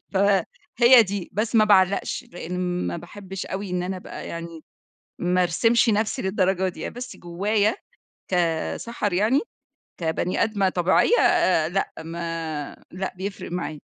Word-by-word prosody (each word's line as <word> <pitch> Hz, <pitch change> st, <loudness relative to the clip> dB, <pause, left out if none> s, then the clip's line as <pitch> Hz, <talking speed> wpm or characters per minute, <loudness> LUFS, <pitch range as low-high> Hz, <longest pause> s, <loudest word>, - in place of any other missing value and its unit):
فهي 205 Hz, +5 st, +4 dB
دي، 200 Hz, -3 st, -4 dB
بس 215 Hz, +4 st, -2 dB
ما 215 Hz, -, +6 dB
باعلقش، 195 Hz, -2 st, +2 dB
لأن 180 Hz, +1 st, -3 dB
ما -, -, -2 dB
باحبش 190 Hz, +2 st, -8 dB
أوي 190 Hz, 0 st, -5 dB
إن 180 Hz, 0 st, -1 dB
أنا 185 Hz, +1 st, -3 dB
أبقى 180 Hz, -, -8 dB
يعني 170 Hz, -1 st, -7 dB, 0.5 s
ما 180 Hz, +1 st, +2 dB
أرسِمش 230 Hz, +8 st, +3 dB
نفسي 215 Hz, 0 st, +1 dB
للدرجة 190 Hz, -1 st, +1 dB
دي، 185 Hz, -, -6 dB
بس 245 Hz, +1 st, -8 dB
جوّايا- 205 Hz, +5 st, 0 dB, 0.6 s
كسَحَر- 180 Hz, +5 st, -1 dB
يعني 215 Hz, +9 st, +3 dB, 0.6 s
كبني 165 Hz, +2 st, 0 dB
آدمة 200 Hz, -3 st, +1 dB
طبيعية، 185 Hz, -, +3 dB, 0.5 s
لأ 195 Hz, +3 st, -2 dB
ما 165 Hz, -2 st, -5 dB
لأ 190 Hz, +2 st, -4 dB
بيفرق 195 Hz, -1 st, -6 dB
معايا. 175 Hz, -2 st, -3 dB
185 Hz, 130 wpm, -24 LUFS, 175-205 Hz, 0.6 s, ما